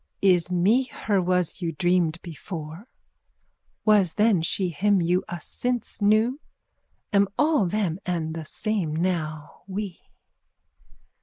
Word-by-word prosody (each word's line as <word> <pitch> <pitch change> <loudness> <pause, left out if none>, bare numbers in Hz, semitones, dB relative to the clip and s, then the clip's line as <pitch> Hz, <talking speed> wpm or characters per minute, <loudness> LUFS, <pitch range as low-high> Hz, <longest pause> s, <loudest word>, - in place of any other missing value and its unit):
_ - - -44 0.2
Is 180 -3 +3
me 205 +9 +3
her 210 -5 -1
was 180 0 0
you 165 -2 -2
dreamed 175 0 +1
before? 165 - -8 1.0
Was 205 -6 +4
then 210 -5 +3
she 180 +3 0
him 195 +5 +2
you 175 +2 +1
us 175 -2 -4
since 245 -3 -3
knew? 215 +6 +3 0.7
Am 200 0 +4
all 295 - +3
them 190 -3 -1
and 165 -3 -2
the 160 -1 -6
same 195 -4 -2
now 155 -3 -3
we? 195 -2 -5
180 Hz, 130 wpm, -25 LUFS, 165-210 Hz, 1.0 s, Was